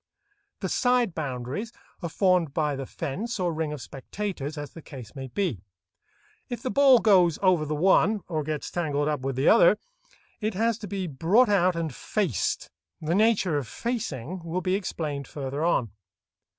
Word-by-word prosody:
The 190 - -1
side 245 -4 +2
boundaries 145 - -4 0.3
are 170 - -3
formed 180 -5 +2
by 150 -3 +1
the 135 -1 -5
fence 195 - -4
or 175 -2 0
ring 160 -1 -2
of 150 -3 -6
spectators, 150 +1 -5
as 145 -1 -6
the 165 - -11
case 125 -8 -10
may 135 -1 -6
be. 135 - -2 0.9
If 240 0 -5
the 255 - -1
ball 275 -2 +7
goes 185 -8 +4
over 180 -5 +4
the 155 - -1
one, 195 +5 +3
or 160 -3 -1
gets 150 0 -4
tangled 145 -4 0
up 150 -2 0
with 135 0 -3
the 135 +3 +1
other, - - +6 0.6
it 215 -2 -2
has 230 +2 +1
to 210 - -7
be 195 -1 -3
brought 175 - +3
out 185 -3 +3
and 165 -4 -2
"faced." 185 - -1 0.3
The 160 +2 -1
nature 195 -6 +3
of 130 - -6
"facing" 185 - -4
will 170 +2 -2
be 185 0 0
explained 155 -8 -3
further 140 +1 -4
on. 125 - +1
170 Hz, 175 wpm, -26 LUFS, 145-205 Hz, 0.9 s, ball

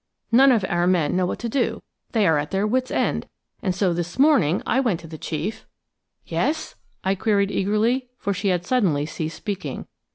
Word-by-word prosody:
None 265 +4 +7
of 220 -6 +2
our 175 0 +1
men 180 -4 +2
know 180 -1 +2
what - - -3
to 240 - -4
do; 245 +2 -1 0.3
they 220 -3 +2
are 160 -4 +4
at 145 - -3
their 195 +1 0
wits' 255 +4 0
end, - - 0 0.3
and 185 -2 -1
so 190 -2 +1
this 175 0 -4
morning 260 - +4
I 260 - +2
went 225 -11 +1
to 165 - -10
the 160 -1 -9
chief–" 165 +8 -4 0.6
"Yes?" 315 +1 -1 0.3
I 190 - +2
queried 200 0 +1
eagerly, 225 +7 +1
for 200 - -1
she 200 - -2
had 180 -2 +1
suddenly 180 - +2
ceased 160 +1 -5
speaking. 200 -3 -5
195 Hz, 195 wpm, -23 LUFS, 175-235 Hz, 0.6 s, None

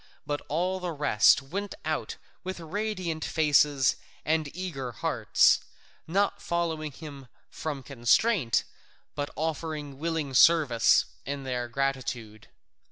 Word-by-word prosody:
But 145 0 -2
all 180 +5 -1
the 180 -2 -3
rest 140 -3 +4
went 200 - -5
out - - -2 0.3
with 185 -1 -5
radiant 180 -2 -3
faces 145 -3 +3 0.3
and 155 -1 +1
eager 135 -10 -4
hearts, - - +3 0.5
not 200 +4 +1
following 165 -3 -2
him 140 -2 -10 0.2
from 145 -4 -5
constraint, 135 - +2 0.5
but 145 0 -3
offering 155 -3 -4
willing 160 -3 -2
service 140 -5 +5 0.2
in 140 0 -4
their 125 -2 -2
gratitude. 120 -4 -3
150 Hz, 110 wpm, -28 LUFS, 135-170 Hz, 0.5 s, service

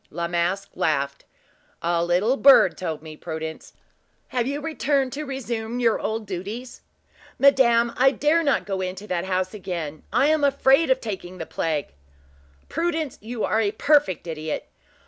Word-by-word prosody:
La 170 +2 -3
Masque 175 +3 -1
laughed. 140 -2 -1 0.6
"A 170 0 +1
little 180 +9 +2
bird 275 -9 +6
told 160 -4 -4
me, 155 -1 -9
Prudence! 160 0 -7 0.6
Have 245 -1 -1
you 285 +1 -2
returned 285 -4 0
to 300 +2 -4
resume 240 -3 -4
your 230 -3 +2
old 220 0 -3
duties?" 205 +7 -6 0.6
"Madame, 235 -4 +4
I 265 +2 +5
dare 295 +5 +2
not 285 -4 +1
go 195 -2 -3
into 185 +2 -5
that 180 -3 -2
house 185 0 -1
again. 170 -7 -5
I 245 +6 +3
am 310 0 +2
afraid 275 +2 +4
of 260 0 +2
taking 185 -4 -6
the 165 - -5
plague." 155 - -2 0.7
"Prudence, 325 -4 -2
you 225 +1 -5
are 220 - +2
a 205 - +2
perfect 290 - +2
idiot! 155 -2 -4
215 Hz, 155 wpm, -24 LUFS, 175-270 Hz, 0.7 s, bird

